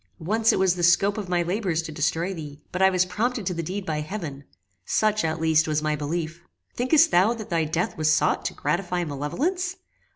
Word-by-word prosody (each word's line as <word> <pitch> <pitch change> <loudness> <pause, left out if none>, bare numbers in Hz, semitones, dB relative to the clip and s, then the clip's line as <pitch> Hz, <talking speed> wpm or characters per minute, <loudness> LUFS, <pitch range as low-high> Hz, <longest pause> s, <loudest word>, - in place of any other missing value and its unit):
Once 215 +7 +2
it - - 0
was 190 -2 +3
the 180 - -5
scope 185 +4 +4
of 205 -4 -5
my 175 -1 +1
labours 175 -2 -1
to 160 - -6
destroy 165 +5 -1
thee, 150 -4 -8
but 180 - -3
I 190 - +7
was 185 -1 +2
prompted 220 +4 -2
to 180 - -1
the 170 - -3
deed 185 +4 -4
by 155 -3 -2
heaven; 150 -5 -6 0.4
such, 215 - +1
at 160 0 -1
least, 160 0 +3
was 155 0 0
my 155 0 +1
belief. 160 +3 -4 0.3
Thinkest 305 +6 +4
thou 195 +7 +4
that 220 -2 -9
thy 165 -2 +1
death 165 +3 -2
was 155 0 +3
sought 155 - +2
to - - -2
gratify 175 +4 -1
malevolence? 295 - -2
175 Hz, 215 wpm, -25 LUFS, 155-205 Hz, 0.4 s, I